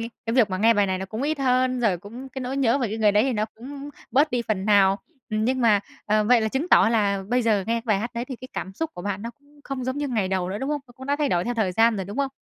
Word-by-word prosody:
cái 230 +1 -5 0.2
cái 225 - -1
việc 230 -6 +4
mà 185 - -2
nghe 225 +3 +5
bài 205 -1 +3
này 190 -1 -1
nó 190 - -5
cũng 220 +5 -5
ít 300 +1 -1
hơn, 255 -1 +1
rồi 205 -7 +2
cũng 235 +8 -10
cái 265 +1 -7
nỗi 255 +2 -3
nhớ 270 0 +2
về 240 -5 -1
cái 220 - -4
người 210 -2 +4
đấy 210 +1 +4
thì 265 +1 0
nó 215 -2 0
cũng 280 +4 -9 0.2
bớt 285 +5 +3
đi 245 -2 0
phần 200 -3 -1
nào. 200 -2 +4 0.3
Ừm, 215 0 0
nhưng 260 +2 0
mà, 215 -4 +4 0.3
ờ, 215 0 +2
vậy 240 +1 +5
là 220 - 0
chứng 270 +9 -2
tỏ 225 - +6
là 200 -4 +1
bây 250 0 +2
giờ 220 -3 +3
nghe 230 - +1
cái 230 - -2
bài 215 -4 +2
hát 235 +4 -3
đấy 235 +1 -2
thì 260 0 -7
cái 255 +2 -11
cảm 190 - -5
xúc 320 +10 -3
của 175 - -7
bạn 200 0 -3
nó 230 - -5
cũng 290 +1 -24
không 265 -2 -4
giống 260 +2 -2
như 290 - -2
ngày 215 -7 0
đầu 185 -1 -1
nữa, 200 - -3
đúng 270 +5 -3
không? 295 - -1
Nó 245 - -17
cũng 265 +1 -9
đã 285 - +1
thay 295 -2 0
đổi 175 0 +1
theo 245 - -2
thời 210 -5 0
gian 225 +3 +3
rồi, 190 - -3
đúng 200 +4 -8
không? 275 -1 0
230 Hz, 340 wpm, -24 LUFS, 205-260 Hz, 0.3 s, tỏ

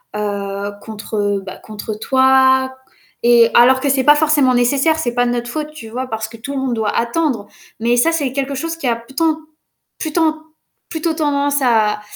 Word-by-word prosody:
heu, 200 -1 -3
contre, 220 0 -8
heu, 205 -1 0
bah, 190 -1 -9
contre 215 0 -7
toi 265 0 +3 0.5
et 235 -1 +6
alors 255 +2 +6
que 285 - -1
c'est 265 -1 +2
pas 295 +2 +6
forcément 295 -4 +3
nécessaire. 280 +6 +2
C'est 240 -6 -2
pas 245 0 +2
de 240 - 0
notre 240 0 -3
faute, 305 +2 -4
tu 230 -8 -10
vois? 255 +3 -4
Parce 220 -2 -4
que 230 - -13
tout 250 +6 -7
le 270 - -2
monde 260 -2 -1
doit 220 -2 -1
attendre 235 -3 -1 0.3
mais 235 +2 +1
ça, 285 +7 +3
c'est 290 -6 -1
quelque 275 0 -2
chose 330 +4 -3
qui 275 - -3
a 235 - +2
plutôt- 310 +7 -1 0.6
plutôt- 315 -1 0 0.5
plutôt 320 0 -2
tendance 285 -2 0
à 215 -4 +2
260 Hz, 195 wpm, -17 LUFS, 225-290 Hz, 0.6 s, et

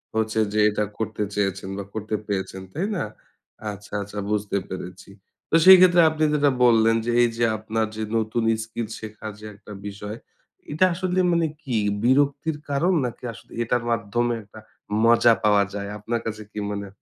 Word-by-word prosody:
হচ্ছে 110 0 0
যে 105 - +1
এটা 105 0 -1
করতে 110 -1 -2
চেয়েছেন 95 -1 -1
বা 100 - -4
করতে 110 0 -3
পেরেছেন। 95 -1 -3
তাই 175 +6 -1
না? - - -1 0.7
আচ্ছা, 105 0 -12
আচ্ছা 105 +1 -6
বুঝতে 105 -1 0
পেরেছি। 90 +1 -8 0.4
তো - - +2
সেই 190 0 +11
ক্ষেত্রে 180 -1 +6
আপনি 155 0 -2
যেটা 145 -1 +3
বললেন 115 -1 +5
যে 120 - 0
এই 120 - +5
যে 120 - +1
আপনার 110 +1 -1
যে 110 - -5 0.2
নতুন 110 +1 -1 0.2
স্কিল 115 0 -5
শেখার 110 0 -7
যে 110 - -11
একটা 105 +1 -14 0.2
বিষয় 105 +2 -7 0.5
এটা 155 +5 +3
আসলে 185 +1 -1
মানে 170 -1 +2 0.2
কি? 125 -5 -1 0.3
বিরক্তির 140 +4 +2
কারণ 165 +7 +2
নাকি 120 0 -6
আসলে - - -16
এটার 120 +1 0
মাধ্যমে 115 +2 0
একটা 105 +2 -14 0.5
মজা 115 0 +6
পাওয়া 105 -1 +4
যায়? 100 0 -4
আপনার 115 +3 -3
কাছে 110 -1 -4
কি 105 - -5
মনে 100 -1 -4
110 Hz, 175 wpm, -24 LUFS, 105-125 Hz, 0.7 s, সেই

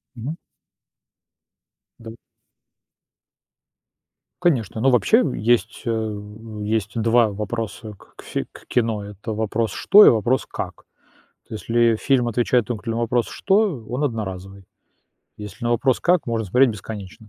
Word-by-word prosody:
Мгм. 130 +7 -5 1.6
Да. 115 -1 -9 2.3
Конечно, 120 - +1
но 135 - +4
вообще 220 - +4
есть, 120 +2 0
э, 110 -3 -2 0.4
есть 110 0 -2
2 115 0 +3
вопроса 110 +1 -5
к - - -17
фи - - -4
к - - -15
кино- 115 -4 0
это 105 +2 -7
вопрос: 110 0 -1
"Что?" 210 +1 +6
И - - +9
вопрос: 120 +3 +1
"Как?". - - -7 0.6
То, - - -9
если 115 +1 +2
фильм 130 0 +1
отвечает 120 +1 +1
только 115 -1 -5
на 115 - -1
вопрос: 120 0 0
"Что?"- 190 - +1
он 125 +4 -3
одноразовый. 100 -6 -4 0.7
Если 105 +3 -8
на 120 - 0
вопрос: 130 +2 +2
"Как?"- 180 -1 +2
можно 115 -3 -2
смотреть 125 +5 +4
бесконечно. 105 0 -9
115 Hz, 130 wpm, -22 LUFS, 105-125 Hz, 2.3 s, И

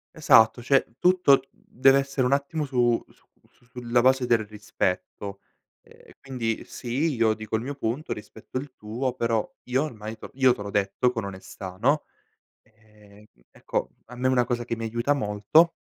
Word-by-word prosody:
Esatto, 115 -6 +5
cioè 130 -3 +2
tutto 180 -6 +5
deve 135 +2 +3
essere 135 -1 -1
un 125 - +2
attimo 145 +2 -1
su 120 -3 +1
su - - -26 0.2
su - - -32
sulla 120 -1 0
base 130 0 +3
del 115 -2 +2
rispetto, 100 -1 -4 0.4
ehm, - - -19
quindi 120 -5 -3
sì, 135 +6 -2
io 115 -3 +2
dico 110 0 -4
il 110 - -4
mio 140 +3 -5
punto, 135 +4 -3
rispetto 110 +3 -7
il 135 0 -6
tuo, 120 +5 -3
però 115 -3 0 0.2
io 130 +3 +1
ormai 110 -6 -7
te - - -11
l - - -9
io 130 -2 +4
te - - -9
l'ho 100 - -6
detto 105 +5 +1
con 110 -4 -4
onestà, 95 -1 -8
no, 145 +6 +2 0.6
ehm, 105 -1 -21 0.3
ecco - - -3 0.2
a 125 - -11
me 130 +1 0
una 125 -1 +3
cosa 120 0 -2
che 115 - -2
mi 115 - -5
aiuta 120 +5 0
molto 130 - +3
120 Hz, 175 wpm, -25 LUFS, 110-135 Hz, 0.6 s, Esatto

